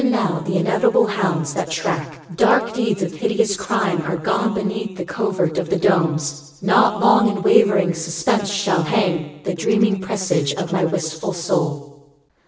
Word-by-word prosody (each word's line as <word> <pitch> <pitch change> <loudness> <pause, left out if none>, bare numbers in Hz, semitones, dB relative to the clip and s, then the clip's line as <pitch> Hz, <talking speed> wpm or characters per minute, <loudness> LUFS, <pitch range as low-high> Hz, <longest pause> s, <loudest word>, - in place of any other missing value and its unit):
Even 255 -1 +2
now 195 -8 0
the 180 +3 -2
inevitable 195 +5 +2
hounds 185 -8 -1
that 155 - -3
track 160 -2 -4
Dark 230 +3 +3
deeds 220 -5 -1
of 175 -1 -4
hideous 205 +5 0
crime 190 -3 -1
Are 170 +2 -3
gone 200 +6 -1
beneath 205 -1 -4
the 180 - -5
covert 180 -3 -1
of 175 - -4
the - - +1
domes. 155 -5 0
Not 205 +1 +3
long 215 +2 +5
in 200 -2 -3
wavering 200 -5 +4
suspense 170 +6 -1
shall 195 -3 +1
hang 160 -5 -1
The 185 - -2
dreaming 210 +3 +1
presage 185 -7 -1
of 175 -2 -4
my 185 - +1
wistful 160 -1 -3
soul. 145 -4 -4
185 Hz, 165 wpm, -20 LUFS, 160-205 Hz, -, long